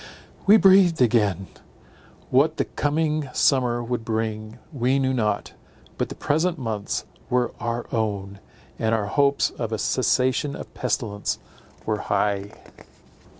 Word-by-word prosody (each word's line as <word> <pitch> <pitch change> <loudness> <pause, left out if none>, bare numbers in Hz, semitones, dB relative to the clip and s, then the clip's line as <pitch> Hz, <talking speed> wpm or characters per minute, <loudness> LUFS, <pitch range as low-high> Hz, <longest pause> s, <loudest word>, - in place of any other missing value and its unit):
We 210 +2 +9
breathed 190 -4 +5
again. 105 -6 +2 0.9
What 155 +5 +3
the - - +1
coming 150 -1 -1
summer 125 -3 +2
would 120 -1 -3
bring, 110 0 -3 0.2
we 130 0 +1
knew 130 -1 +1
not; 105 -5 -1 0.5
but - - -1
the - - -7
present 160 +4 0
months 110 -6 -3 0.2
were 125 -1 +1
our 120 0 -3
own, 100 -3 -2 0.4
and 110 0 +1
our 110 -2 -1
hopes 140 +7 +2
of 115 -2 -5
a 110 - -1
cessation 130 +4 +1
of - - -9
pestilence 105 -6 -2 0.5
were 105 -1 -1
high. 100 0 0
120 Hz, 130 wpm, -24 LUFS, 110-140 Hz, 0.9 s, We